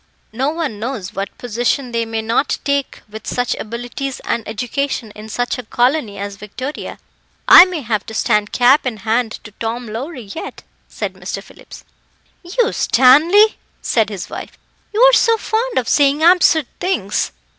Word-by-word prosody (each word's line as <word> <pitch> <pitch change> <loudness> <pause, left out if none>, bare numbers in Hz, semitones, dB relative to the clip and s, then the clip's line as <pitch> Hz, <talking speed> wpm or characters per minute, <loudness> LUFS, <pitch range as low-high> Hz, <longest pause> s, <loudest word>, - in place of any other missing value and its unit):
"No 260 +5 0
one 305 -9 -3
knows 215 -5 -5
what 195 0 -5
position 245 +2 -1
they 230 -1 -1
may 225 0 -3
not 230 +5 0
take 280 -1 -2
with 215 +1 -10
such 245 0 -1
abilities 245 +4 -5
and 235 - -2
education 245 +1 -3
in 215 +1 -11
such 245 +3 -2
a - - -6
colony 240 -2 0
as 200 0 -6
Victoria. 255 +8 -7 0.5
I 355 - +10
may 360 -4 -4
have 215 -4 -2
to 220 - -7
stand 210 -1 +1
cap 255 +3 +4
in 230 -4 -3
hand 225 0 0
to 215 - -11
Tom 235 +2 -3
Lowrie 235 0 -7
yet," 325 - -8 0.2
said - - -5
Mr. - - -6
Phillips. - - -14 0.6
"You, 450 +7 0
Stanley!" 320 - +5 0.3
said 220 -3 +1
his 200 -4 -6
wife; - - -8 0.3
"you 430 +2 0
are - - +7
so 460 -2 +4
fond 460 +3 -2
of 245 - 0
saying 290 +1 +3
absurd 340 -3 +5
things." 285 - -1
245 Hz, 165 wpm, -18 LUFS, 220-300 Hz, 0.6 s, I